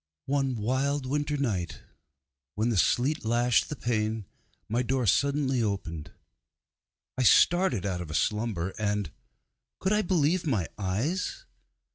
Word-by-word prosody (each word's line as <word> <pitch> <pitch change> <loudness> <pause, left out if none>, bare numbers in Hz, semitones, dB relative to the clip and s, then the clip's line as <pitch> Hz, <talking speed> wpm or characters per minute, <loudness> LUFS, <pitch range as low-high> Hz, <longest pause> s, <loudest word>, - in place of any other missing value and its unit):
One 135 -2 0
wild 130 +5 0
winter 145 +2 -1
night, 100 -11 -2 0.7
when 110 +3 +1
the 115 - 0
sleet 135 - +2
lashed 120 +1 +2
the 150 - -3
pane, 110 -4 -1 0.4
my 120 +3 0
door 125 0 0
suddenly 135 +4 +2
opened. 85 -8 -3 1.1
I - - +3
started 130 - +4
out 90 -3 -2
of 85 - -7
a 75 - -4
slumber, 105 -4 -1
and 105 -5 -1 0.7
could 190 +2 0
I 210 - +3
believe 175 -2 +1
my 105 - 0
eyes? 130 - -2
120 Hz, 130 wpm, -28 LUFS, 105-140 Hz, 1.1 s, started